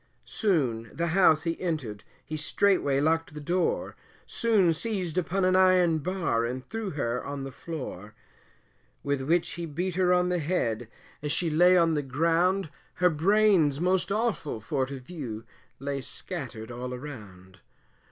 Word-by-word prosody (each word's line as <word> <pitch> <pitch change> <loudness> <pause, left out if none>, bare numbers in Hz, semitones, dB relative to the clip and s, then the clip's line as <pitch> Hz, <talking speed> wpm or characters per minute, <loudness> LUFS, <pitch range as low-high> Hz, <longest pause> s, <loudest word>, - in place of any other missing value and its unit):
Soon 135 - 0
as - - -17
the 170 +1 0
house 160 -3 +4
he 165 -1 -3
entered, 145 - -3 0.2
he 155 - -5
straightway 155 -2 +2
locked 160 +1 0
the - - -5
door, 175 +5 -1 0.3
Soon 210 -8 +2
seized 185 -3 -3
upon 185 +1 0
an 185 0 +3
iron 185 -3 +4
bar, 165 -8 -1
and 125 +2 -4
threw 220 - -4
her 125 -6 -2
on 140 -1 -5
the 135 - -6
floor; 115 - -7 0.9
With 140 -1 -1
which 165 +5 +1
he 170 -1 -5
beat 175 +5 -3
her 180 0 +2
on 180 0 +3
the 180 -1 0
head, 120 -9 -1 0.3
as 150 0 -2
she 165 +2 0
lay 180 +4 +5
on 165 -2 +4
the 150 - +1
ground, 165 +6 +1 0.2
Her 180 -1 +3
brains 170 -3 +3
most 180 +1 +1
awful 205 - -1
for 130 +4 -1
to 135 0 -6
view, 125 -6 -7 0.3
lay 140 0 -3
scattered 125 -7 -7
all 125 +1 -5
around. 100 -9 -10
160 Hz, 160 wpm, -27 LUFS, 135-180 Hz, 0.9 s, lay